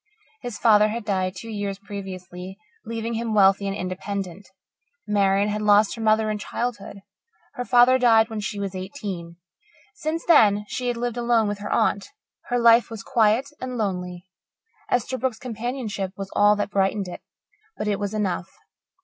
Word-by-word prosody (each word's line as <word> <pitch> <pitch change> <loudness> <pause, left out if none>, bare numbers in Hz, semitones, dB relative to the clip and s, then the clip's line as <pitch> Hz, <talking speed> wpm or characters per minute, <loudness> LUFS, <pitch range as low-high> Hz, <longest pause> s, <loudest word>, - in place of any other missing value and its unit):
His 245 -3 -6
father 210 -2 +5
had 220 +1 -4
died 185 -2 -1
two 225 +3 -7
years 205 -2 -3
previously, 190 -2 -8 0.3
leaving 230 0 -3
him 225 -1 -2
wealthy 200 0 +4
and 195 +1 -2
independent. 185 0 -5 0.6
Marian 200 0 +2
had 210 0 -2
lost 210 0 +4
her 230 - -7
mother 215 0 +2
in 210 - -3
childhood; 210 -2 -4 0.5
her 245 - -4
father 250 +1 +5
died 225 -3 +5
when 220 -2 -5
she 205 0 -4
was 200 -1 -3
eighteen. 185 -4 -6 0.6
Since 330 -5 -3
then 210 -10 +5
she 250 - -3
had 240 -1 -1
lived 240 0 -3
alone 235 -2 +2
with 205 0 -3
her 205 - -5
aunt. 200 - +1 0.4
Her 245 - -1
life 235 0 +5
was 225 -4 -7
quiet 230 0 +2
and 255 -1 -4
lonely. 180 -4 -3 0.7
Esterbrook's 255 0 0
companionship 225 -5 -4
was 195 -1 -6
all 205 0 +5
that 205 0 -3
brightened 195 0 0
it, 180 - -8 0.6
but 210 - -3
it 205 -1 0
was 205 +1 -3
enough. 190 -3 -2
210 Hz, 165 wpm, -24 LUFS, 195-230 Hz, 0.7 s, father